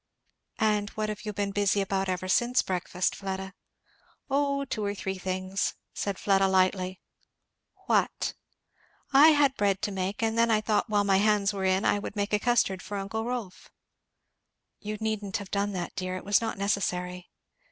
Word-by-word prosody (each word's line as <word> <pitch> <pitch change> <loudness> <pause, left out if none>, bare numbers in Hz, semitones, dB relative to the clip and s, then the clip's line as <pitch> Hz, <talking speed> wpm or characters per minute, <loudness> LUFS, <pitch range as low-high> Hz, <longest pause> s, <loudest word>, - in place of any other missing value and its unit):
"And 210 -2 +1
what 215 0 -1
have 215 +2 -6
you 210 - -2
been 200 -1 -2
busy 205 0 +2
about 195 -1 -1
ever 185 0 -2
since 240 +6 +3
breakfast, 180 0 -1
Fleda?" 190 -1 -5 0.8
"O 280 0 +1
two 220 -5 -3
or 205 0 -1
three 190 -1 -4
things," 185 +1 -2 0.2
said 200 -2 -3
Fleda 195 -1 +3
lightly. 185 0 +1 0.9
"What?" - - +1 0.8
"I 280 +3 +9
had 290 -3 +4
bread 200 -2 +2
to 205 - 0
make 195 +3 -3
and 225 0 +1
then 230 0 +3
I 220 -1 +4
thought 215 +1 0
while 205 -1 +3
my 195 -1 +3
hands 205 0 +2
were 195 -1 -2
in 190 +1 +2
I 205 - +3
would - - -6
make 205 0 -2
a 210 - +4
custard 205 -6 +1
for 200 +2 -5
uncle 210 +3 -3
Rolf." 235 -7 -5 1.1
"You 215 0 -5
needn't 215 -3 -2
have 200 -2 -9
done 200 0 0
that, 175 -2 -4
dear! 185 0 -3
it - - -9
was 205 +3 +3
not 225 -2 -3
necessary." 180 -3 -2
200 Hz, 175 wpm, -28 LUFS, 190-215 Hz, 1.1 s, I